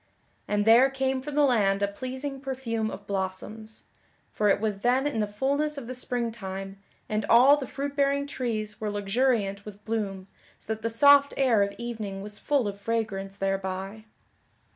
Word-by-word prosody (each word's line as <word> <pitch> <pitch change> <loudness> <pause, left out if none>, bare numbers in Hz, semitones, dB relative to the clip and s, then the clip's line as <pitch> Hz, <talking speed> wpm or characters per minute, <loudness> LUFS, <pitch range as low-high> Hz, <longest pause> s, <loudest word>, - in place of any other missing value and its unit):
And 205 0 0
there 235 +4 +7
came 265 -1 -1
from 290 +2 -6
the 295 - +4
land 205 -7 +3
a - - +3
pleasing 260 +6 -5
perfume 245 -5 -2
of 200 - -8
blossoms; 200 +3 -5 0.5
for 210 -1 +1
it 200 - +3
was 210 -2 -2
then 250 +5 +2
in 290 -6 -1
the 210 - +1
fulness 280 +8 -1
of 275 - -6
the 255 - -5
spring 245 -2 -2
time, 195 -2 -7 0.3
and 215 0 -1
all 255 +5 +7
the 280 -3 -5
fruit 280 +4 -4
bearing 280 0 +2
trees 220 -7 -3
were 215 - -1
luxuriant 205 0 0
with 210 0 -11
bloom 200 -4 -3 0.3
so 220 - -4
that 220 - -9
the 230 - -1
soft 280 +4 +6
air 250 -6 +3
of 200 0 0
evening 215 -5 -5
was 205 0 -6
full 280 -7 +1
of 200 0 -6
fragrance 200 -3 -2
thereby. 195 +2 -3
220 Hz, 180 wpm, -27 LUFS, 200-265 Hz, 0.5 s, there